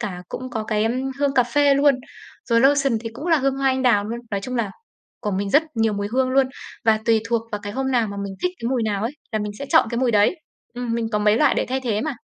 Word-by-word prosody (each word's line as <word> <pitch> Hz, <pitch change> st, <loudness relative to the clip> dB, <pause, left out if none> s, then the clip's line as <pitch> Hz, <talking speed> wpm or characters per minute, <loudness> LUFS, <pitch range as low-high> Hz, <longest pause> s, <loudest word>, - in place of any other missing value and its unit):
cả 185 Hz, -6 st, -5 dB
cũng 255 Hz, 0 st, -6 dB
có 220 Hz, -3 st, -3 dB
cái, 215 Hz, -1 st, 0 dB
ưm, 225 Hz, -, +1 dB, 0.3 s
hương 280 Hz, -1 st, +1 dB
cà 255 Hz, -, +5 dB
phê 280 Hz, +3 st, +3 dB
luôn, 280 Hz, 0 st, +4 dB, 0.5 s
rồi 230 Hz, -1 st, +4 dB
lotion 275 Hz, -2 st, +3 dB
thì 225 Hz, -, -5 dB
cũng 295 Hz, -, -7 dB
là 335 Hz, -2 st, +4 dB
hương 270 Hz, 0 st, 0 dB
hoa 275 Hz, -, -1 dB
anh 260 Hz, 0 st, 0 dB
đào 235 Hz, -5 st, +3 dB
luôn, 230 Hz, +3 st, -4 dB
nói 200 Hz, -1 st, -1 dB
chung 255 Hz, +5 st, -5 dB
là 220 Hz, -4 st, -1 dB, 0.5 s
của 210 Hz, -, -2 dB
mình 200 Hz, +1 st, -2 dB
rất 295 Hz, +7 st, +5 dB
nhiều 225 Hz, -1 st, +2 dB
mùi 205 Hz, 0 st, -3 dB
hương 260 Hz, 0 st, +2 dB
luôn. 265 Hz, 0 st, +3 dB, 0.4 s
Và 220 Hz, -1 st, +4 dB
tùy 225 Hz, -1 st, +3 dB
thuộc 235 Hz, -1 st, +1 dB
vào 210 Hz, -, -3 dB
cái 205 Hz, -, -5 dB
hôm 265 Hz, +3 st, -2 dB
nào 240 Hz, -3 st, +2 dB
mà 200 Hz, -, -6 dB
mình 195 Hz, -1 st, -6 dB
thích 360 Hz, -, +2 dB
cái 230 Hz, -, -3 dB
mùi 255 Hz, -3 st, 0 dB
nào 210 Hz, -2 st, -1 dB
ấy, 235 Hz, +5 st, -2 dB, 0.2 s
là 215 Hz, -, 0 dB
mình 210 Hz, -1 st, -3 dB
sẽ 280 Hz, -, -5 dB
chọn 320 Hz, -8 st, +4 dB
cái 235 Hz, -, -2 dB
mùi 255 Hz, -1 st, +2 dB
đấy. 210 Hz, -, +3 dB, 0.4 s
Ừm, 245 Hz, -1 st, -3 dB
mình 230 Hz, -1 st, -1 dB
có 210 Hz, -, +2 dB
mấy 210 Hz, +1 st, +3 dB
loại -, -, +4 dB
để -, -, 0 dB
thay 265 Hz, +1 st, -1 dB
thế 225 Hz, -5 st, -1 dB
mà. 310 Hz, +3 st, -2 dB
235 Hz, 290 wpm, -22 LUFS, 215-265 Hz, 0.5 s, cà